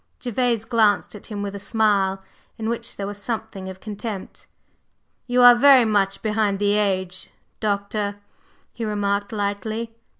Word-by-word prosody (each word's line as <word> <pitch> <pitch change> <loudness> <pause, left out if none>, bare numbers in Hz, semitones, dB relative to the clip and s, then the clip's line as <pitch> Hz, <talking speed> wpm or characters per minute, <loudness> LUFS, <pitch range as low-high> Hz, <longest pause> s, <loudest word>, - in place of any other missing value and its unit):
Gervase 240 -2 0
glanced 225 -3 +2
at 210 - -10
him 205 -2 -5
with 200 -1 -4
a 200 - -6
smile, 200 -3 +1 0.3
in 220 -1 -4
which 235 0 -3
there 200 - -3
was 205 0 -5
something 220 -4 -4
of 190 0 -9
contempt. 210 -1 -7 0.8
"You 245 0 +3
are 245 0 +11
very 260 0 +6
much 200 -3 +1
behind 210 -2 +1
the 205 0 +1
age, 185 -3 -1 0.3
Doctor," 205 0 -1 0.6
he 235 - -6
remarked 205 -1 -1
lightly. 215 +2 -3
210 Hz, 145 wpm, -23 LUFS, 200-225 Hz, 0.8 s, are